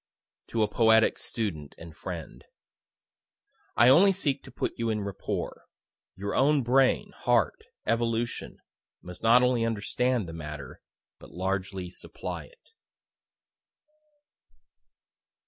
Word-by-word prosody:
(To 115 -2 0
a - - +2
poetic 110 +1 +4
student 85 -11 -3
and 80 -1 -11
friend.) 85 -3 -7 1.3
I 120 +2 +7
only 185 +9 +7
seek 145 -8 0
to - - -12
put - - -3
you 115 -1 -2
in 105 -1 -1
rapport. 100 -1 -5 0.5
Your 100 +1 -4
own 140 0 +3
brain, 130 +2 +3
heart, 120 -5 +1 0.2
evolution, 115 0 -1 0.5
must 90 0 -9
not 120 +2 +6
only 125 -2 +2
understand 115 0 0
the 80 - -7
matter, 75 -3 -8 0.4
but - - -13
largely 95 0 -3
supply - - -7
it. - - -23
115 Hz, 110 wpm, -28 LUFS, 95-125 Hz, 1.3 s, I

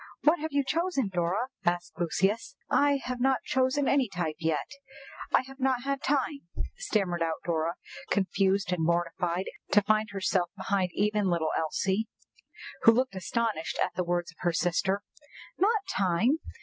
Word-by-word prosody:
"What 310 +3 +4
have 315 +1 -3
you 285 0 +2
chosen, 305 - 0
Dora?" 185 +7 0
asked 175 -1 0
Lucius. 195 +6 0 0.2
"I 285 -1 +4
have 250 0 -4
not 265 0 +2
chosen 260 +2 +1
any 270 -5 +3
type 165 -4 -3
yet, 160 -2 0 0.6
I - - +4
have 270 +1 -13
not 260 -2 +1
had 275 0 -1
time," 280 0 0 0.4
stammered 195 - -1
out 165 -1 -1
Dora, 165 0 0 0.3
confused 195 -1 +1
and 170 -2 -1
mortified 170 +2 0 0.3
to 210 - +6
find 215 +1 +2
herself 190 -3 0
behind 190 -1 0
even 210 -1 +1
little 165 -3 +1
Elsie, 190 +7 0 0.7
who 230 - +8
looked 255 -1 +1
astonished 200 -2 -2
at 180 - 0
the 180 - -1
words 175 0 -1
of 165 - -26
her 175 -1 0
sister. 185 +4 +1 0.6
"Not 425 +2 +3
time! 200 - +2
195 Hz, 155 wpm, -29 LUFS, 175-260 Hz, 0.7 s, who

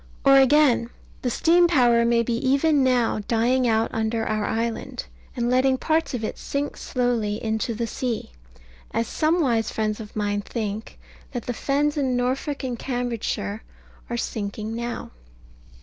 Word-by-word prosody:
Or 275 0 +8
again, 270 -3 +4 0.3
the 250 - 0
steam 345 +8 +4
power 240 -7 +4
may 235 0 +3
be 235 - -1
even 275 +4 +2
now 245 -4 +2
dying 245 +2 +2
out 225 0 +2
under 225 0 -1
our 215 -1 -1
island, 230 0 -3 0.3
and 240 0 -1
letting 260 +1 +3
parts 315 0 0
of 230 - -4
it - - -4
sink 285 +1 -3
slowly 240 -5 -1
into 220 +1 -2
the 235 +2 -1
sea, 230 - -3 0.6
as 230 +1 -1
some 330 +2 +1
wise 230 -6 +1
friends 215 0 -2
of 210 -2 -9
mine 205 -1 0
think 215 0 -5 0.4
that 245 - -4
the 245 - -2
fens 290 +5 0
in 260 -3 +1
Norfolk 265 +4 -1
and 245 -3 -3
Cambridgeshire 240 -4 -3 0.5
are 240 - -2
sinking 215 0 -4
now. 235 +1 -4
240 Hz, 155 wpm, -24 LUFS, 225-265 Hz, 0.6 s, Or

